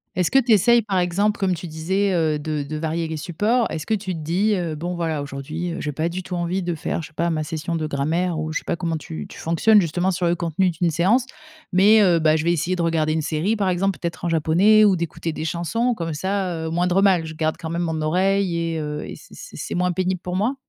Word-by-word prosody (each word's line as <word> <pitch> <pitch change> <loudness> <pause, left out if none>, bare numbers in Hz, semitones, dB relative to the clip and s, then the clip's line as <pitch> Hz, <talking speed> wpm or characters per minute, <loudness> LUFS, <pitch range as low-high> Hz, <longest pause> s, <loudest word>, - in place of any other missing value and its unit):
Est-ce 180 -2 +1
que - - +3
tu 250 -3 +3
essayes, 235 +3 +5
par 195 -3 0
exemple, 200 +5 +1
comme 185 -2 +1
tu 170 +1 -7
disais, 190 +6 -1
heu, 160 -3 +1
de 150 0 -3
de 155 +2 -5
varier 160 +1 -2
les 160 -1 -4
supports? 210 +9 0
Est-ce 155 -1 -4
que 220 - +2
tu 195 -2 -4
te 165 - -5
dis: 185 +8 +1
«Heu, 170 -4 -2
bon 175 +4 -4
voilà 160 -4 -2
aujourd'hui, 150 +5 -5
heu, - - -5
j'ai 150 - -2
pas 155 +3 -1
du 180 +2 -4
tout 180 0 -6
envie 175 +2 -1
de 175 -1 -2
faire, 165 - -3
je 160 - -8
sais - - -22
pas, 170 +1 0
ma 155 -1 -1
session 160 +1 -4
de 155 -1 -2
grammaire» 160 +5 -1
ou 155 0 -3
je - - 0
sais - - -18
pas - - -1
comment 170 -1 -2
tu 80 - -7
tu - - -12
fonctionnes 200 +6 +4
justement 175 +3 0
sur 175 -1 0
le 170 - +2
contenu 170 +2 0
d'une 170 0 0
séance? 195 - +2 0.5
Mais, 205 +4 +6
heu: 175 -3 +4
«Bah, 155 -1 +3
je 155 - 0
vais 170 - +2
essayer 175 +3 -1
de 175 - -2
regarder 160 -2 +1
une 160 0 -1
série, 160 +8 0
par 200 -3 0
exemple, 190 +2 0
peut-être 170 0 -5
en - - +1
japonais 175 +7 +4
ou 195 -3 +4
d'écouter 165 -1 -3
des 155 - -4
chansons 230 +9 -1
comme 165 -3 -4
ça, 185 0 -2
heu, - - -2
moindre 180 +3 +1
mal, 185 -5 +3
je 160 - -7
garde 155 0 -1
quand 160 -2 -5
même 170 +1 -1
mon 160 -2 -2
oreille 190 +3 +1
et 165 -1 -2
heu, 150 0 -4
et - - -7
c'est - - -16
c'est - - -11
c'est - - -4
moins 180 +1 +1
pénible 185 0 -1
pour 180 0 -4
moi?» 220 +8 0
170 Hz, 270 wpm, -22 LUFS, 160-190 Hz, 0.5 s, Mais